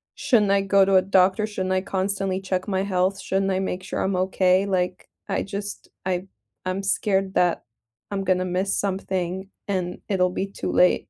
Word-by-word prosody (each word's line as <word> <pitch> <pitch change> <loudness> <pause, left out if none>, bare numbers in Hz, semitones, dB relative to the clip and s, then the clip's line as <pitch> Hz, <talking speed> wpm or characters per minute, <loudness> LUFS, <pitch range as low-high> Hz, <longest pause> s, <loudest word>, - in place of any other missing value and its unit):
shouldn't 230 -9 +3
I 200 - +4
go 195 0 +4
to 195 0 +3
a 185 - +7
doctor? 190 +2 +3
Shouldn't 190 -3 -2
I 185 - +2
constantly 195 0 -1
check 185 0 -2
my 190 -1 0
health? 190 0 0
Shouldn't 195 0 0
I 190 - +1
make 185 -1 -3
sure 180 - -4
I'm 190 -1 0
okay? 185 +1 +2
Like, 180 -2 -1 0.2
I - - 0
just, 200 +1 -6 0.2
I 185 0 -1 0.4
I'm 185 +2 -2
scared 195 -1 +1
that 175 -1 +2 0.5
I'm 195 -1 -1
gonna 185 -1 +1
miss 185 +2 0
something 190 -1 -2 0.2
and 180 -3 -2
it'll 180 -2 +2
be 195 - -2
too 195 - -4
late. 180 - +4
190 Hz, 185 wpm, -24 LUFS, 185-195 Hz, 0.5 s, a